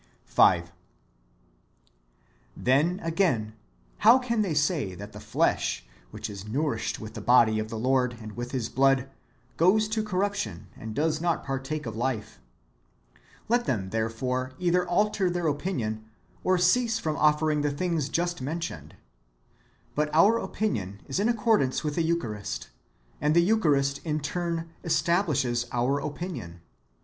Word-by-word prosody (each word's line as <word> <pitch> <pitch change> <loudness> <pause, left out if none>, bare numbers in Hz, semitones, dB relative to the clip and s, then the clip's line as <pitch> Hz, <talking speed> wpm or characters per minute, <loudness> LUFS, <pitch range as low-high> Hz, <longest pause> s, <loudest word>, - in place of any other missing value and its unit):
^ - - -33 0.2
5. - - +4 1.9
Then, 150 +9 +2
again, 160 - 0 0.5
how 230 +4 +7
can 235 -3 0
they 185 -7 -1
say 145 - 0
that - - -9
the - - -10
flesh, - - 0 0.2
which - - -6
is 100 0 -8
nourished 130 0 -1
with 110 0 -8
the 110 - -6
body 110 -1 +5
of 110 0 -3
the 115 - -5
Lord 125 0 +1
and 110 -1 -8
with 120 +3 -5
His 125 -4 -2
blood, 135 0 +2 0.5
goes 205 +6 +4
to 220 0 0
corruption, 195 - -2
and 110 -1 -7
does 155 +1 0
not 170 -1 0
partake 135 +2 -3
of 115 -2 -5
life? 115 - -3 1.1
Let 240 +2 +2
them, 95 -6 -2
therefore, 125 +4 -2
either 180 0 +1
alter 195 +1 +2
their 175 -1 -2
opinion, 135 - -2 0.4
or 185 0 +3
cease 225 +6 +3
from 155 -8 -2
offering 150 0 +2
the 145 - +1
things 155 -1 -1
just 175 -1 -1
mentioned.^ 135 - -5 1.0
But 150 0 0
our 210 +8 +5
opinion 100 - -3
is - - -2
in 210 +3 +2
accordance 220 - +2
with 150 -1 -1
the 170 - 0
Eucharist, 120 - -2 0.5
and 150 +1 +2
the 170 - +6
Eucharist 145 -9 +2
in 155 -2 -1
turn 165 +2 -3
establishes 155 -8 +1
our 125 +4 +1
opinion. 145 - -6
150 Hz, 145 wpm, -27 LUFS, 120-175 Hz, 1.9 s, how